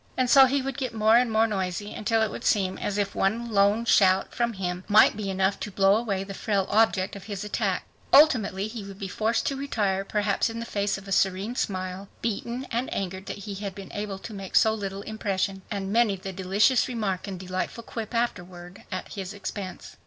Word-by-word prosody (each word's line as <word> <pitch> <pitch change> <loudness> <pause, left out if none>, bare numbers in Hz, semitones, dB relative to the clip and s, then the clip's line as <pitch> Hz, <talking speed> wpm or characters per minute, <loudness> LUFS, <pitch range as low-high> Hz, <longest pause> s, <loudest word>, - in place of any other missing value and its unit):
And 255 -1 +2
so 270 -1 +9
he 270 +1 0
would 270 0 -4
get 255 -4 -3
more 220 +1 +4
and 245 -1 +4
more 220 +1 +4
noisy 200 -1 -3
until 225 +1 +1
it 220 - -1
would - - -7
seem 190 -3 +1
as 205 - -2
if 200 -1 -1
one 230 +4 0
lone 205 +3 +3
shout 190 -4 +4
from 235 -1 0
him 180 -2 -4
might 210 0 +6
be 205 -2 -4
enough 190 +1 0
to - - -4
blow 195 0 +4
away 205 -4 -1
the 195 0 -7
frail 200 -1 0
object 210 -3 +2
of 200 - -9
his 205 -2 -5
attack. 210 - -1 0.3
Ultimately 220 -9 +5
he 220 -1 -7
would 195 -1 -10
be 195 -1 -5
forced 220 +4 0
to 275 - 0
retire, 210 -8 -1
perhaps 205 +1 0
in 225 0 -5
the 230 - -4
face 200 -3 -1
of 195 0 -12
a - - -7
serene 195 +4 +1
smile, 185 -3 -3
beaten 235 +3 -3
and 240 +2 -1
angered 190 0 -4
that 200 - -6
he 205 - -5
had 195 -1 -5
been 195 -2 -10
able 205 -1 -4
to 215 +3 -9
make 195 -2 -7
so 220 - +5
little 200 -2 -5
impression. 195 -3 -2
And 200 -1 -3
many 230 -3 +3
the 190 0 -7
delicious 195 +7 +2
remark 210 -7 -2
and 190 -2 -5
delightful 185 +5 -4
quip 225 0 -6
afterward 180 -5 -3
at 185 - -5
his 195 0 -6
expense! 200 -1 -7
205 Hz, 215 wpm, -26 LUFS, 195-225 Hz, 0.3 s, so